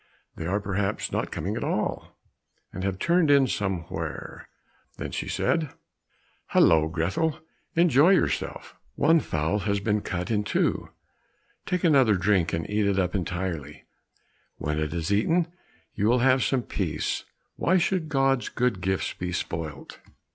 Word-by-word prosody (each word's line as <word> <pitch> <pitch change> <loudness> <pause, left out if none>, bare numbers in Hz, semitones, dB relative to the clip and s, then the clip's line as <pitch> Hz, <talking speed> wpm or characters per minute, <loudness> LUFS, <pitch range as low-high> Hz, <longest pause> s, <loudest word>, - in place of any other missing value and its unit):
They 80 - -5
are 100 +3 +1
perhaps 100 0 -2
not - - -1
coming - - -3
at - - -3
all, - - -2 0.6
and 95 - -5
have 95 -1 -1
turned 170 - +2
in 140 -1 +6
somewhere." 95 -7 -4 0.5
Then - - -5
she - - -4
said, 155 -4 0 0.7
"Hallo, 80 -1 +4
Grethel, 90 - -1 0.4
enjoy 165 -2 +5
yourself, 185 - -1 0.2
one 165 +3 +4
fowl 80 - -1
has 100 0 0
been 105 +1 0
cut 90 +1 -3
into, 105 -2 0 0.8
take 180 -1 -1
another 135 - +5
drink, 90 -2 +2
and 80 -1 -2
eat 105 0 +1
it 100 -1 +1
up 90 -2 +1
entirely; 85 -6 -4 0.7
when 75 +1 -2
it 75 -1 -2
is 85 +3 -1
eaten 165 - +1 0.4
you 105 - 0
will 120 +2 +4
have 130 0 +4
some 130 -3 +1
peace, 80 -9 -2 0.3
why 185 - +2
should 175 -2 0
God's 135 -3 +1
good 120 -6 0
gifts 95 0 -1
be 90 0 -4
spoilt?" 80 -4 -5
100 Hz, 145 wpm, -26 LUFS, 90-135 Hz, 0.8 s, in